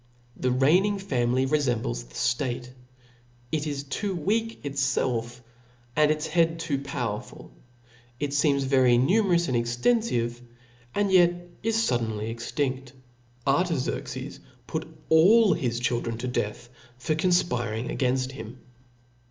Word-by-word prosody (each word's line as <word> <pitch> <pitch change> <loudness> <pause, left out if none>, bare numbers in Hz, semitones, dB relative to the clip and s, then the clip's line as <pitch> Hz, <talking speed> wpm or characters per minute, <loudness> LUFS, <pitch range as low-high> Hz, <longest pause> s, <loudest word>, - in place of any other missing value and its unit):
The 125 - -1
reigning 175 +11 +3
family 130 -8 0
refembles 120 - 0
the - - -17
ftate; 125 0 -1 0.8
it 155 -1 -1
is 145 -1 -3
too 190 +7 -3
weak 225 +7 -1
itfclf, 130 -4 -1 0.6
and 150 0 +4
its 155 0 0
head 165 0 +2
too 155 -4 -1
powerful; 125 - -5 0.7
it 145 -1 -2
feems 140 -1 +2
very 130 -2 +4
numerous 175 - +3
and 130 - 0
extenfive, 120 - 0 0.6
and 205 -1 +1
yet 175 -2 +5 0.3
is 225 0 0
fuddenl/. 115 - 0
extinft, 130 +2 -3 0.5
Artaxerxes 140 - -1
{J) - - -25 0.2
put - - -4 0.2
all 195 +6 +6
his 125 -7 -1
children 120 -1 -1
to 125 - -4
death 120 -1 -3
(y) 125 - -26 0.2
See 130 +5 -1
* - - -1
for - - -7
confpiring 125 -11 0
againft 130 0 0
him. 120 -2 -9
135 Hz, 130 wpm, -26 LUFS, 120-165 Hz, 0.8 s, all